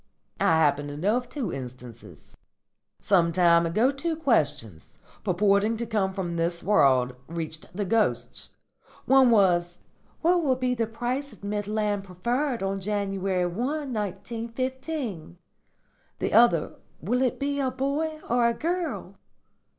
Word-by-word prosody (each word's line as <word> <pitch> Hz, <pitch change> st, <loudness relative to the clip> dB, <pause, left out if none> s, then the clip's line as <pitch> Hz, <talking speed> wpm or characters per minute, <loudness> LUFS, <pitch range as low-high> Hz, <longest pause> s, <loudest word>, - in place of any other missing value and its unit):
I 165 Hz, -, +4 dB
happen 145 Hz, -2 st, +2 dB
to 145 Hz, 0 st, -7 dB
know 200 Hz, +8 st, +1 dB
of 245 Hz, -1 st, -5 dB
two 250 Hz, -, -4 dB
instances. 125 Hz, -2 st, -10 dB, 0.6 s
Some 175 Hz, -4 st, +3 dB
time 170 Hz, -1 st, +4 dB
ago 220 Hz, +11 st, +2 dB
two 320 Hz, +4 st, -2 dB
questions, 150 Hz, -, -1 dB, 0.3 s
purporting 200 Hz, +4 st, +2 dB
to 235 Hz, -, -3 dB
come 210 Hz, -4 st, 0 dB
from 180 Hz, -3 st, -4 dB
this 170 Hz, +1 st, -1 dB
world, 130 Hz, -10 st, +3 dB
reached 160 Hz, -1 st, -5 dB
the 205 Hz, -, -1 dB
ghosts. 220 Hz, +3 st, 0 dB, 0.6 s
One 265 Hz, -1 st, +6 dB
was, 175 Hz, -5 st, +3 dB, 0.4 s
'What 350 Hz, +1 st, +3 dB
will 270 Hz, -5 st, +2 dB
be 255 Hz, 0 st, 0 dB
the 230 Hz, -2 st, -1 dB
price 250 Hz, +5 st, -3 dB
of 200 Hz, -, -19 dB
Midland 205 Hz, 0 st, -1 dB
Preferred 235 Hz, -, -2 dB
on 195 Hz, 0 st, -1 dB
January 195 Hz, -2 st, -1 dB
1, 260 Hz, -, -2 dB
1915?' 230 Hz, -, -4 dB, 0.8 s
The -, -, -2 dB
other, 220 Hz, -7 st, +4 dB, 0.2 s
'Will 245 Hz, +9 st, 0 dB
it 255 Hz, -2 st, 0 dB
be 285 Hz, 0 st, -1 dB
a 265 Hz, -2 st, +1 dB
boy 285 Hz, +4 st, -2 dB
or 240 Hz, 0 st, +3 dB
a 235 Hz, -, 0 dB
girl?' 345 Hz, +5 st, -3 dB
210 Hz, 135 wpm, -26 LUFS, 175-255 Hz, 0.8 s, One